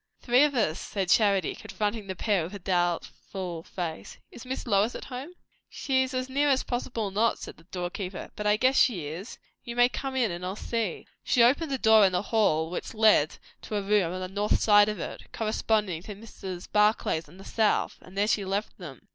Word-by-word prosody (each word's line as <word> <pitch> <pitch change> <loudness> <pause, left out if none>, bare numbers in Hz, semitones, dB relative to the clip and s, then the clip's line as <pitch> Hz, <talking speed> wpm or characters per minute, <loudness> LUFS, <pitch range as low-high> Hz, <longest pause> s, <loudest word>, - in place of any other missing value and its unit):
"Three 245 +3 +4
of 290 -2 -1
us," 190 -9 +1
said 195 -3 -3
Charity, 200 -2 +3
confronting 210 0 -4
the 190 - -4
pair 200 0 +1
with 180 +5 -7
a - - -4
doubtful 175 -1 -2
face. 170 -1 -6
"Is 240 - -11
Miss 260 +1 -4
Lois 210 0 +2
at - - -7
home?" 270 +6 -7 0.4
"She's 260 -1 0
as 255 0 -1
near 285 +2 +1
as 265 -1 +2
possible 235 -4 -3
not," 220 +4 +2
said - - -9
the 165 - -20
door 175 -1 -4
keeper; 185 -1 -6
"but 210 0 -3
I 210 0 +4
guess 260 +4 +3
she 190 - +3
is. 170 +10 -7 0.3
You 235 -1 -6
may 245 0 +5
come 270 0 -5
in, 240 -6 +1
and 175 +1 -6
I'll 185 +2 -3
see." 225 -3 -3 0.2
She 240 - +3
opened 280 +6 +3
a 270 - 0
door 220 -3 +6
in 190 -2 +4
the 180 - 0
hall 160 -7 +2
which 180 - -5
led 215 -9 +4 0.2
to 215 - -6
a 205 - -1
room 200 -4 +2
on 185 +1 -5
the 185 - -3
north 205 +3 0
side 205 -1 +5
of 210 - -4
it, - - -7
corresponding 215 -5 0
to 205 +3 -8
Mrs. 190 -4 -8
Barclay's 210 -6 +2
on 180 - -16
the 195 - -12
south; 220 -2 0
and 185 +2 -14
there 205 +1 +2
she 210 -2 +1
left 195 +3 -3
them. 150 -8 -10
210 Hz, 215 wpm, -27 LUFS, 185-235 Hz, 0.4 s, door